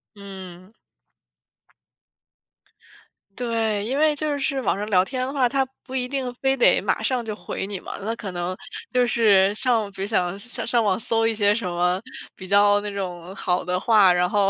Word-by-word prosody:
嗯。 190 -1 -11 2.6
对， 225 -3 -2
因 260 +5 -2
为 305 0 +2
就 295 0 -1
是 275 -1 -1
网 220 - -1
上 205 - -4
聊 185 -3 +3
天 255 +4 -4
的 265 - -6
话， 265 -3 +2
他 270 +1 0 0.2
不 260 - -12
一 255 -1 -1
定 260 -2 -3
非 270 +2 0
得 245 - +4
马 - - -2
上 255 -3 0
就 215 -1 -5
回 180 +1 -6
你 200 -2 -5
嘛， - - -8
那 220 +3 -4
可 205 -4 -7
能 175 +1 -4 0.3
就 250 -1 +1
是 205 -5 +3
像 225 -3 +3
比 195 - -9
如 195 - -2
想 185 -3 -1
上 235 +1 -3
上 235 0 +1
网 205 -4 +1
搜 225 0 +5
一 225 - -1
些 205 -1 +3
什 220 -4 -3
么 180 +1 0 0.4
比 185 - -10
较 205 +1 +4
那 205 0 -5
种 185 -2 -6
好 180 -2 -1
的 180 0 -2
话， 200 -2 +4
然 180 0 +1
后 200 -1 +1
210 Hz, 205 characters per minute, -22 LUFS, 190-245 Hz, 2.6 s, 搜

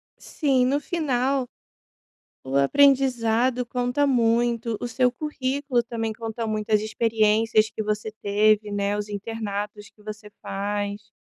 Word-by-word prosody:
Sim, 270 -5 0
no 275 +3 +1
final 275 -5 0 1.0
o 135 +1 0
aprendizado 250 - +3
conta 245 +4 0
muito. 235 -2 +1
O - - -2
seu 250 +1 +2
currículo 270 -2 -1
também 230 -1 -3
conta 225 +1 -5
muito, 215 0 -3
as 210 - +4
experiências 220 0 +2
que 220 - -5
você 215 +1 -2
teve, 210 +1 +2
né, 205 0 -1
os 210 0 -3
internatos 205 -1 -5
que 210 - -25
você 210 0 -8
faz, 205 +1 -4
225 Hz, 130 wpm, -24 LUFS, 210-250 Hz, 1.0 s, as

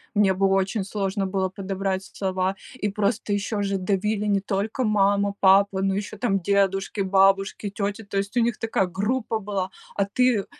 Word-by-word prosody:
Мне 200 -2 +4
было 195 +1 +2
очень 195 +2 0
сложно 195 0 -2
было 190 0 -1
подобрать 195 0 -3
слова, 190 -1 -2 0.2
и 210 -5 -2
просто 205 +1 -1
ещё 205 +1 -1
же 195 0 0
давили 205 +3 -1
не 200 -1 +2
только 205 +6 -2
мама, 200 -2 +2
папа, 195 0 +4
но 195 0 +1
ещё 205 +1 -4
,там, 200 -3 +1
дедушки, 195 +1 +1
бабушки, 195 +1 +2
тети, 205 +2 -3
то 200 0 -5
есть, 200 +5 -2
у - - +5
них 235 -1 +1
такая 225 -4 +1
группа 220 +5 -1
была, 195 -3 -3 0.3
а 200 - +2
ты, 250 +3 +2
э, - - -12
200 Hz, 180 wpm, -24 LUFS, 195-210 Hz, 0.3 s, у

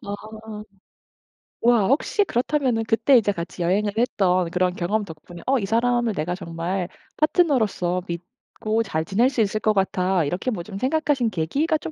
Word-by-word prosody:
아. 215 +1 -7 1.0
와 235 -4 +4
혹시 310 - +2
그렇다면은 255 - 0
그때 235 +4 +4
이제 205 -3 +2
같이 170 0 -6
여행을 205 +4 +1
했던 185 -7 +2
그런 180 0 +1
경험 205 +5 -1
덕분에 170 0 -11
'어 270 -1 +2
이 195 - -2
사람을 235 +1 +1
내가 175 +1 -2
정말 175 +1 -3 0.3
파트너로서 230 - +2
믿고 215 +5 -4
잘 160 -7 -2
지낼 225 +9 +2
수 255 -4 0
있을 215 0 0
것 215 0 +2
같아.' 190 -2 +1
이렇게 180 - -2
뭐 175 -6 -4
좀 195 +1 -8
생각하신 270 -1 +1
계기가 280 - 0
좀 310 - -7
210 Hz, 325 characters per minute, -23 LUFS, 180-245 Hz, 1.0 s, 와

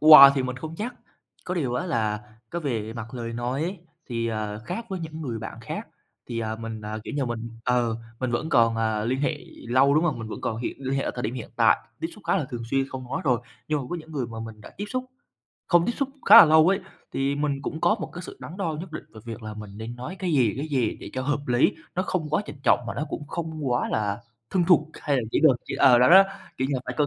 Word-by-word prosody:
quà 150 -2 +11
thì 135 - +1
mình 130 -1 -3
không 160 +4 -6
chắc, 240 +6 -4 0.5
có 180 - -2
điều 135 -9 -1
á 180 - -1
là 110 -9 0 0.3
cái 170 - -3
về 115 -8 -2
mặt 115 +1 -7
lời 115 -2 -4
nói 120 +4 -2
ấy, 180 +4 -3 0.3
thì, 115 -2 -2
à, 105 -2 -3
khác 205 - -4
với 190 - -3
những 160 -1 -6
người 120 -6 -3
bạn - - -7
khác, - - -6 0.4
thì, 115 -1 -4
à, 110 -1 -2
mình, 115 -1 -6
à, 105 +1 -5
kiểu - - -5
như 140 - +1
mình 115 -1 -4 0.2
ừ, 120 -2 +2 0.3
mình 130 -1 0
vẫn 120 +6 -1
còn, 115 -5 +4
à, 110 -1 0
liên 130 +3 0
hệ 150 +1 0 0.3
lâu, 135 +3 +5
đúng 155 +3 +4
hông? 150 -8 0
Mình 115 -1 -6
vẫn - - -6
còn 110 - -2
hiện 115 - -4
liên 135 0 -2
hệ 135 - +1
ở - - -1
thời 120 - -4
điểm 115 +2 -2
hiện 120 -4 -6
tại, 115 -2 +5 0.2
tiếp 165 - -1
xúc 210 - -15
khá - - +3
là 170 - 0
thường 120 -2 -4
xuyên, 135 0 +1
không 130 -1 -6
nói - - -1
rồi, 125 -3 +2 0.3
nhưng 150 -1 +1
mà - - -5
có 175 - -1
những 160 -1 -10
người 135 -5 -2
mà 115 -1 -7
mình 110 -1 -8
đã - - -11
tiếp 205 - -3
xúc 255 0 -2 0.6
không 175 0 +4
tiếp - - +1
xúc 275 - 0 0.2
khá - - +10
là 230 - +13
lâu 160 +1 +6
ấy, 195 +1 +2 0.3
thì 135 +1 0
mình 140 -1 -1
cũng 155 +3 -4
có 175 - +4
một - - -4
cái 180 - -7
sự - - -9
đắn 170 - -8
đo 170 -6 -2
nhất 175 -1 -9
định 155 - -6
về 110 - -10
việc 115 -1 -7
là 110 0 -6
mình 105 -1 -8
nên 115 +2 -6
nói 140 +10 -6
cái 180 -3 -1
gì, 125 -8 +3
cái 145 +4 -3
gì 130 -7 0
để - - -8
cho 130 - -2
hợp 145 +2 0
lý, 120 +1 +3 0.2
nó 185 - +1
không 175 -6 -2
quá 155 - +2
trịnh - - -8
trọng - - +4
mà - - -4
nó 150 - -2
cũng 145 - -5
không 160 -3 -4
quá 120 +1 +1
là 105 -1 -1 0.3
thân 180 -2 +2
thuộc 165 -3 +4
hay 145 -2 +1
là 125 - +1
chữ - - +3
được 145 -6 +6
chữ - - -4
ờ, 125 -3 +7
đó 125 - +6
đó, 190 +3 +10 0.3
kiểu 130 +1 0
như 140 - 0
là, 130 - -1
phải 125 - -3
cân 150 - +4
135 Hz, 285 wpm, -26 LUFS, 115-160 Hz, 0.6 s, là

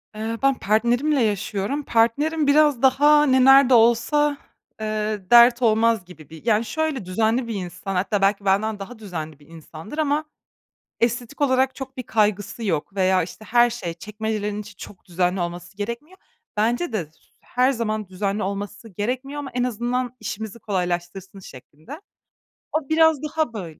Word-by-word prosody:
Eee, 225 +1 -4
ben 275 0 +4
partnerimle 240 +7 +1
yaşıyorum. 210 +6 -2
Partnerim 280 +7 +1
biraz 290 -3 +4
daha 295 +3 +5
ne 260 -1 +4
nerede 270 -1 +7
olsa, 240 +6 +3 0.4
eee, 215 -2 -2
dert 240 +1 +7
olmaz 225 -3 +2
gibi 160 -5 -15
bir 160 +6 -13
yani, 225 0 +2
şöyle, 290 - -2
düzenli 225 +6 0
bir 230 - -4
insan, 190 +1 -5
hatta 195 +2 0
belki 200 0 +1
benden 205 +2 +1
daha 220 +4 -9
düzenli 160 -7 -7
bir 145 - -20
insandır 165 - -11
ama 305 0 0 0.7
estetik 240 +4 -1
olarak 260 -1 +2
çok 265 0 -8
bir 255 - -4
kaygısı 210 0 -1
yok 190 +1 -2
veya, 185 -2 +2
işte, 215 +5 -10
her 240 +1 +4
şey, 190 -8 -5
çekmecelerin 210 +2 -4
için 205 -1 -13
çok 195 - -12
düzenli 180 +1 -1
olması 175 +2 -6
gerekmiyor. 235 - -6 0.4
Bence 235 +6 0
de 180 -7 -1
s 155 - -26 0.3
her 255 +2 +1
zaman 215 -4 -3
düzenli 200 +2 -2
olması 205 +3 -5
gerekmiyor 255 +9 -4
ama 275 -2 -7
en 245 0 0
azından 245 +1 -2
işimizi 220 +1 -6
kolaylaştırsın 185 -1 -4
şeklinde. 155 - -12 0.7
O 310 -2 -2
biraz 320 -2 +4
daha 305 -4 -2
böyle. 170 -7 -8
220 Hz, 155 wpm, -22 LUFS, 195-260 Hz, 0.7 s, nerede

